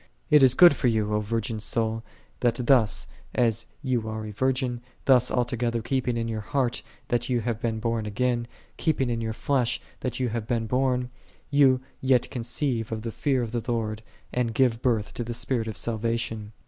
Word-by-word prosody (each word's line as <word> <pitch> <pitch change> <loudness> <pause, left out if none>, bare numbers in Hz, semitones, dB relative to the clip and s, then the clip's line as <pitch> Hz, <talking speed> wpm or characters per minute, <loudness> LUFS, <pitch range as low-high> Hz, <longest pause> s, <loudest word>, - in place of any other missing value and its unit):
It 150 -1 +7
is 130 -1 +7
good 175 -2 +8
for 130 - 0
thee, 110 -1 +2
O 105 0 0
virgin 110 +1 -2
soul, 110 +1 -1 0.4
that 120 -2 +2
thus, 110 - +3 0.3
as 115 -2 +1 0.2
thou 125 -5 0
art 110 0 -5
a - - -6
virgin, 125 +1 0 0.2
thus 125 -2 +5
altogether 120 -2 0
keeping 125 -1 0
in 115 - -1
thy 110 -1 -3
heart 130 +1 -1 0.3
that 120 0 0
thou 125 -1 +2
hast 115 -1 -2
been 115 -2 -1
born 115 -1 -1
again, 120 +2 0 0.3
keeping 135 -6 +1
in 115 - -1
thy 110 -1 -2
flesh 125 +1 0 0.2
that 125 - -3
thou 130 0 -1
hast 110 -1 -4
been 115 -1 0
born, 125 +1 0 0.4
thou 135 -3 +5 0.2
yet 130 -2 +2
conceive 120 -1 -2
of 110 -1 -3
the 115 - -3
fear 130 +1 0
of 115 - -5
the 120 -1 -1
Lord, 110 -2 -2 0.3
and 120 -2 0
give 120 -3 +2
birth 115 -5 0
to 120 - -3
the 120 0 -4
spirit 120 -2 -1
of 110 - -5
salvation. 115 -1 -2
120 Hz, 190 wpm, -26 LUFS, 110-125 Hz, 0.4 s, good